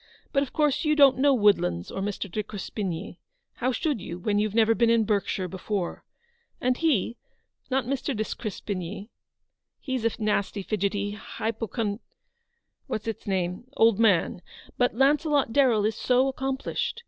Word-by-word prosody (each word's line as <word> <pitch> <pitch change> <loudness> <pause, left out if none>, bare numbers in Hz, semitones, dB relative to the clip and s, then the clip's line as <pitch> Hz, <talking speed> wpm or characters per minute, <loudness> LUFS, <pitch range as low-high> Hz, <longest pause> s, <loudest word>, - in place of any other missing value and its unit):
But 275 - +3
of 280 - -3
course 295 -3 +1
you 305 -1 +2
don't 275 -3 +6
know 285 +1 +5
'Woodlands 200 - +2
or 195 - -4
Mr. 200 0 -3
de 215 +3 -2
Crespigny. 200 -2 -5 0.4
How 255 +2 0
should 265 - -1
you, 170 - -6
when 205 +3 0
you've 210 0 -1
never 225 0 +5
been 235 0 +3
in 230 -1 +4
Berkshire 200 -3 0
before? 190 0 -4 0.6
And 250 0 +1
he 250 - +1 0.3
— - - -43
not 265 -1 +1
Mr. 270 -1 -2
de 215 - +1
Crespigny, 205 -1 -5 0.7
he's 260 -4 -3
a 230 - +3
nasty, 210 -2 -1
fidgety, 205 0 -1
hypochon 220 0 -3 0.4
— 470 0 -49
what's 215 - -3
its 225 -2 -5
name 185 +1 -1
— - - -17
old 225 -2 +5
man? 195 -6 +3 0.2
— - - -20
but 245 -3 +2
Launcelot 285 -1 +2
Darrell 240 -7 +4
is 215 0 0
so 255 +1 +3
accomplished. 270 - -2
220 Hz, 165 wpm, -26 LUFS, 200-265 Hz, 0.7 s, don't